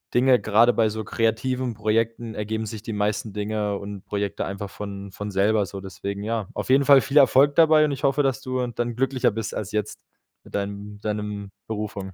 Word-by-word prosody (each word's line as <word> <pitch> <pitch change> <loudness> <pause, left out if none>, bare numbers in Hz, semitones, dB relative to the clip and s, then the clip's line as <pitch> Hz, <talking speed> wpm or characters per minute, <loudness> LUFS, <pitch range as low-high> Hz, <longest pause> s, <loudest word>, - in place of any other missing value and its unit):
Dinge. 125 0 +5
Grade 115 +3 +4
bei 110 -2 +2
so 110 +1 -4
kreativen 120 +3 -1
Projekten 115 +2 -1
ergeben 110 +2 -3
sich 110 -1 -6
die 115 0 -5
meisten 105 +1 -1
Dinge 105 -1 -2
und 100 -1 -8
Projekte 100 -1 -2
einfach 100 +1 -5
von 100 -1 -7
von 105 +1 -6
selber 100 +1 +2
so, 100 -1 -7
deswegen, 100 +1 -6
ja. 110 -3 -2
Auf - - -4
jeden 135 +1 +5
Fall 140 -2 +7
viel 145 +2 -1
Erfolg 140 +2 +6
dabei 155 -2 +6
und 145 - -1
ich 135 - -5
hoffe, 140 +1 +3
dass 135 0 0
du 130 -1 -2
dann 120 0 -3
glücklicher 130 -1 +1
bist 110 +1 -4
als 105 -1 -4
jetzt 105 -1 -3 0.4
mit - - -10
deinem 100 +1 -4
mit 105 +1 -16
deinem 105 -1 -3 0.2
Berufung. 105 -3 -5
110 Hz, 205 wpm, -24 LUFS, 100-125 Hz, 0.4 s, Fall